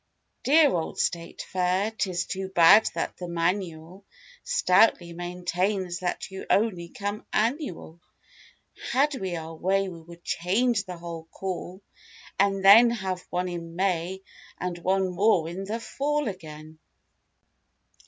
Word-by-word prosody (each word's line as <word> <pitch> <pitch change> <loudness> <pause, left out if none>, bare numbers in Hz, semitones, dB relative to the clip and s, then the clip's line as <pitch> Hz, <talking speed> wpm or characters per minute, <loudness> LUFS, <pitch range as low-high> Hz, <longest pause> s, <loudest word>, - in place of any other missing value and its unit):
Dear 295 +1 +5
old 165 -2 -2
State 170 -1 -2
Fair, 185 +3 0
'tis 185 -5 -2
too 190 0 -4
bad 180 +4 +7
that - - -3
the 180 - -6
manual 170 +1 -2 0.4
Stoutly 180 -2 +3
maintains 180 +1 -2
that 180 +1 -3
you 190 - -8
only 190 -5 +1
come 205 +3 -5
"annual." 215 - -2 0.9
Had 285 +4 +3
we 190 -9 -3
our 160 0 -6
way 195 +4 0
we 170 -2 -10
would 170 +1 -14
change 200 +5 +1
the 180 -1 -7
whole 170 -1 -7
call 185 +2 -6 0.6
and 195 -1 +2
then 225 +5 +9
Have 190 -6 -3
one 180 +1 -1
in 170 -2 -6
May 185 0 -1 0.4
and 180 -1 -3
one 190 +2 +1
more 180 -2 +2
in 185 +4 -5
the 220 +4 -3
fall 290 +4 -1
again. 155 -5 -8
185 Hz, 135 wpm, -26 LUFS, 170-200 Hz, 0.9 s, then